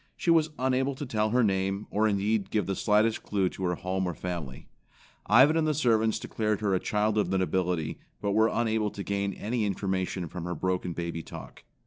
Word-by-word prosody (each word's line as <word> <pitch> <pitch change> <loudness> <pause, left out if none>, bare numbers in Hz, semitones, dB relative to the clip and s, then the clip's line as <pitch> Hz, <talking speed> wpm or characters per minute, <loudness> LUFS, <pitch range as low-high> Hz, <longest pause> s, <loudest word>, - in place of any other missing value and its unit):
She 170 - +1
was 160 -2 +4
unable 130 +1 +1
to 145 - -5
tell 110 -3 0
her 125 +2 +3
name, 95 0 0
or 110 +2 +2
indeed 100 0 0
give 105 -4 0
the 95 +1 -2
slightest 110 +2 +2
clue 95 -3 0
to 95 - -8
her 90 0 0
home 95 +1 -2
or 90 - -3
family. 85 -8 -6 0.6
Ivan 130 +8 +6
and 160 -1 +2
the 155 - +1
servants 115 -5 +2
declared 105 -2 -2
her 100 -2 +1
a 95 - +2
child 105 +2 0
of - - 0
the 95 - +1
nobility, 90 -3 -1 0.2
but 100 - -1
were 110 +2 +4
unable 110 -2 0
to 100 - -7
gain 100 0 -1
any 115 +2 -2
information 95 -3 -2
from 85 +1 -6
her 90 0 -3
broken 90 +1 -1
baby 85 -1 -4
talk. - - -11
100 Hz, 205 wpm, -28 LUFS, 95-110 Hz, 0.6 s, Ivan